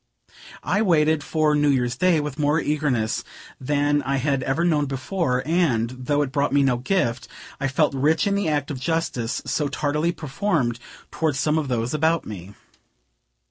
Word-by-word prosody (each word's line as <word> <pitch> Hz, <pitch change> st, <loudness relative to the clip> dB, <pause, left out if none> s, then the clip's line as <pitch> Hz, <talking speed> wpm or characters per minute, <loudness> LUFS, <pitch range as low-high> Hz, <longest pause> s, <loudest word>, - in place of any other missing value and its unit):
I 180 Hz, +8 st, +1 dB
waited 160 Hz, -6 st, +3 dB
for 155 Hz, -1 st, +1 dB
New 150 Hz, 0 st, +3 dB
Year's 125 Hz, -3 st, +1 dB
day 180 Hz, +3 st, +3 dB
with 145 Hz, -1 st, -5 dB
more 150 Hz, +2 st, +2 dB
eagerness 145 Hz, -8 st, -1 dB, 0.4 s
than 145 Hz, +2 st, +1 dB
I 140 Hz, 0 st, -1 dB
had 135 Hz, 0 st, 0 dB
ever 135 Hz, +6 st, 0 dB
known 150 Hz, -4 st, +2 dB
before; 135 Hz, -1 st, -1 dB
and, 145 Hz, -9 st, +1 dB
though 130 Hz, +3 st, -1 dB
it 135 Hz, -, -5 dB
brought 140 Hz, 0 st, 0 dB
me 140 Hz, 0 st, +3 dB
no 130 Hz, -3 st, +2 dB
gift, 120 Hz, -4 st, -1 dB, 0.3 s
I 135 Hz, -, 0 dB
felt 145 Hz, +2 st, +1 dB
rich 150 Hz, +4 st, +2 dB
in 200 Hz, -, +1 dB
the 200 Hz, -4 st, 0 dB
act 145 Hz, -1 st, -1 dB
of 135 Hz, -, -5 dB
justice 130 Hz, -6 st, -2 dB
so 150 Hz, -, 0 dB
tardily 150 Hz, +4 st, 0 dB
performed 150 Hz, -, -1 dB, 0.3 s
toward 155 Hz, -4 st, 0 dB
some 150 Hz, +3 st, +1 dB
of 150 Hz, -, -3 dB
those 120 Hz, 0 st, -1 dB
about 160 Hz, +2 st, +1 dB
me. 100 Hz, -1 st, -9 dB
145 Hz, 175 wpm, -23 LUFS, 130-160 Hz, 0.4 s, waited